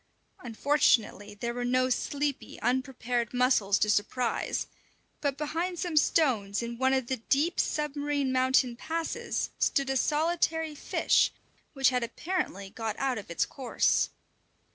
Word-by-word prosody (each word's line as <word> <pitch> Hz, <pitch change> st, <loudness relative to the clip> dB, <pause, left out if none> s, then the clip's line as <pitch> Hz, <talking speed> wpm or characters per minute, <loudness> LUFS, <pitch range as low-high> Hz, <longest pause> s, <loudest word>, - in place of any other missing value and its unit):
Unfortunately 230 Hz, -4 st, +1 dB
there 235 Hz, +3 st, -3 dB
were 245 Hz, 0 st, -3 dB
no 255 Hz, +1 st, +2 dB
sleepy, 285 Hz, +2 st, -2 dB
unprepared 250 Hz, -1 st, -1 dB
mussels 245 Hz, -6 st, +3 dB
to 210 Hz, -, +2 dB
surprise; 220 Hz, +3 st, 0 dB, 0.6 s
but 285 Hz, -2 st, -1 dB
behind 335 Hz, +4 st, -2 dB
some 345 Hz, -2 st, -3 dB
stones 235 Hz, -9 st, +2 dB
in 235 Hz, 0 st, -6 dB
one 260 Hz, 0 st, +3 dB
of 265 Hz, -2 st, +1 dB
the 260 Hz, +2 st, -2 dB
deep, 285 Hz, +9 st, 0 dB
submarine 290 Hz, -2 st, -1 dB
mountain 260 Hz, -1 st, +2 dB
passes 330 Hz, -, -3 dB
stood 275 Hz, -2 st, +1 dB
a -, -, -1 dB
solitary 320 Hz, +2 st, +1 dB
fish, 295 Hz, -, +2 dB, 0.4 s
which 270 Hz, -3 st, +4 dB
had 250 Hz, -1 st, 0 dB
apparently 235 Hz, -, -3 dB
got 225 Hz, -2 st, -4 dB
out 265 Hz, -4 st, -1 dB
of 200 Hz, -, -11 dB
its 170 Hz, -, 0 dB
course. 265 Hz, -4 st, +1 dB
260 Hz, 135 wpm, -29 LUFS, 235-295 Hz, 0.6 s, which